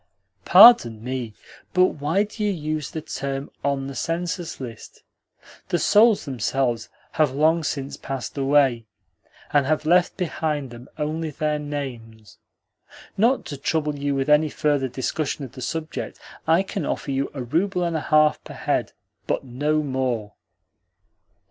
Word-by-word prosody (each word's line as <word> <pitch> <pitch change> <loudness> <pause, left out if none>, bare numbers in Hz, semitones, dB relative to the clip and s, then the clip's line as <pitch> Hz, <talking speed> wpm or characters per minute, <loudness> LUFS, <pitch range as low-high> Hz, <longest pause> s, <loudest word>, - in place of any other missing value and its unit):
"Pardon 180 - +8
me, 125 -3 -4 0.4
but 185 0 +6
why 160 +4 0
do 210 +1 -6
you 210 - +2
use 155 -4 -3
the 160 - -5
term 140 -2 -4
'on 140 -1 0
the 135 - -6
census 170 +5 -3
list'? 115 -4 -9 0.7
The 175 - +2
souls 210 +5 +4
themselves 125 -2 -1 0.2
have 150 -4 +1
long 160 +3 +3
since 140 -2 -3
passed 135 -2 -5
away, 135 -4 +2 0.7
and 145 -2 +3
have 155 0 0
left 175 +2 +3
behind 155 -6 -2
them 120 +1 -11
only 155 +1 -2
their 150 +1 -1
names. 115 -9 -7 0.8
Not 235 +6 +2
to 145 - -6
trouble 150 +1 -1
you 140 0 -1
with 135 -1 -1
any 150 +1 +4
further 145 -2 0
discussion 140 +3 -3
of 125 - -11
the 130 - -10
subject, 160 +4 -4 0.3
I 165 +4 +4
can 195 0 -4
offer 140 - -3
you 135 +1 -1
a 130 - -4
rouble 180 +8 0
and 170 -1 -1
a 160 - -1
half 155 0 +3
per - - -10
head, - - -1 0.3
but - - -1
no 145 +4 -1
more." 125 -6 -2
145 Hz, 150 wpm, -23 LUFS, 130-160 Hz, 0.8 s, Pardon